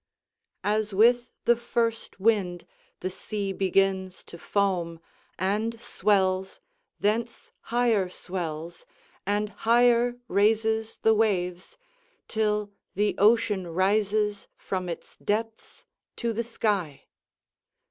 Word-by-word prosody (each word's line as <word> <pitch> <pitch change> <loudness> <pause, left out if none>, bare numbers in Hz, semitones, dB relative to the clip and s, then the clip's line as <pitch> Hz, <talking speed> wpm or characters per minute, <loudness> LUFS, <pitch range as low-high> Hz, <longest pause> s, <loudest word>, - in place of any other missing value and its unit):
["As 210 -1 0
with 240 +4 +4 0.2
the 240 - +5
first 230 -2 -2
wind 190 -5 +1 0.4
the 185 - -2
sea 200 +1 -4
begins 190 0 +1
to 170 - -12
foam, 180 -5 0 0.4
and 215 +5 -1
swells, 190 -3 +1 0.4
thence 225 +3 -1 0.2
higher 230 -6 +2
swells, 170 -3 -6 0.4
and 205 +1 0
higher 240 +3 +3
raises 220 +2 +1
the 220 - +6
waves, 185 -5 0 0.5
till 210 -1 0 0.2
the 210 +1 +1
ocean 205 -3 +3
rises 205 +3 +1
from 185 -2 -3
its 170 - -7
depths 220 +2 -3 0.3
to 235 -2 -2
the 230 +2 -1
sky." 205 -10 -2
205 Hz, 100 wpm, -27 LUFS, 190-225 Hz, 0.5 s, the